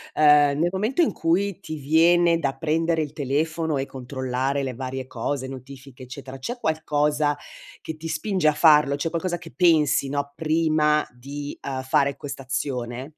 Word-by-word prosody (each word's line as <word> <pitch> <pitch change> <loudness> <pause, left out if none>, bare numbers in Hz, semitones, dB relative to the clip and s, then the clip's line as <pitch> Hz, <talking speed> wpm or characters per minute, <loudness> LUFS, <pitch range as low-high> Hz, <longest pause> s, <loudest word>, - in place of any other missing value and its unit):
uhm, 150 -1 +5
nel 175 +2 +2
momento 215 - 0
in - - +1
cui 190 +3 0
ti 155 - -7
viene 165 +3 +4
da 135 -4 -1
prendere 165 +1 0
il 145 0 -8
telefono 155 +2 -1
e 135 - -1
controllare 130 +1 -3
le 130 -1 -3
varie 130 0 -5
cose, 130 +3 -3
notifiche 135 0 -11
eccetera, 130 +1 -9
c'è 240 - -5
qualcosa 150 -2 0 0.4
che 160 - -6
ti 165 +1 -7
spinge 165 +1 0
a - - +1
farlo? 150 -2 +5
C'è 155 +3 -2
qualcosa 175 +1 -2
che 165 -2 -12
pensi, 155 -6 +3
no, 140 0 -2
prima 155 -1 +2
di, 140 +4 -7
uhm, 130 -1 -4
fare 140 0 +1
quest'azione? 130 -2 -4
145 Hz, 160 wpm, -24 LUFS, 135-160 Hz, 0.4 s, uhm